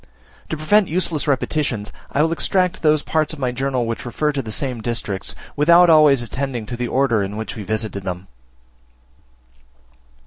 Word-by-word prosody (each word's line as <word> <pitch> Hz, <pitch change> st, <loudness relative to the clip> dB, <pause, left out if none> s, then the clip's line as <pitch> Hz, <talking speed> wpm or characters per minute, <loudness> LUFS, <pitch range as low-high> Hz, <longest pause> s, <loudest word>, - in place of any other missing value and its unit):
To 160 Hz, -, -3 dB
prevent 200 Hz, +6 st, +3 dB
useless 165 Hz, -3 st, 0 dB
repetitions, 135 Hz, -6 st, -1 dB, 0.2 s
I 145 Hz, -, +2 dB
will 160 Hz, -, +1 dB
extract 180 Hz, +2 st, 0 dB
those 155 Hz, -2 st, +3 dB
parts 155 Hz, -1 st, 0 dB
of 155 Hz, -, -9 dB
my 130 Hz, -2 st, 0 dB
journal 130 Hz, -1 st, -1 dB
which 115 Hz, 0 st, -4 dB
refer 150 Hz, +5 st, -1 dB
to 140 Hz, -2 st, -2 dB
the 110 Hz, -4 st, -7 dB
same 125 Hz, -1 st, -2 dB
districts 110 Hz, -4 st, -3 dB, 0.2 s
without 170 Hz, +3 st, +6 dB
always 150 Hz, -5 st, +5 dB
attending 125 Hz, -2 st, -4 dB
to 120 Hz, -, -6 dB
the 120 Hz, 0 st, -3 dB
order 125 Hz, -4 st, +1 dB
in 100 Hz, +1 st, -4 dB
which 110 Hz, -1 st, -5 dB
we 110 Hz, -, -6 dB
visited 110 Hz, 0 st, -2 dB
them. 90 Hz, -1 st, -5 dB
135 Hz, 170 wpm, -20 LUFS, 115-155 Hz, 0.2 s, without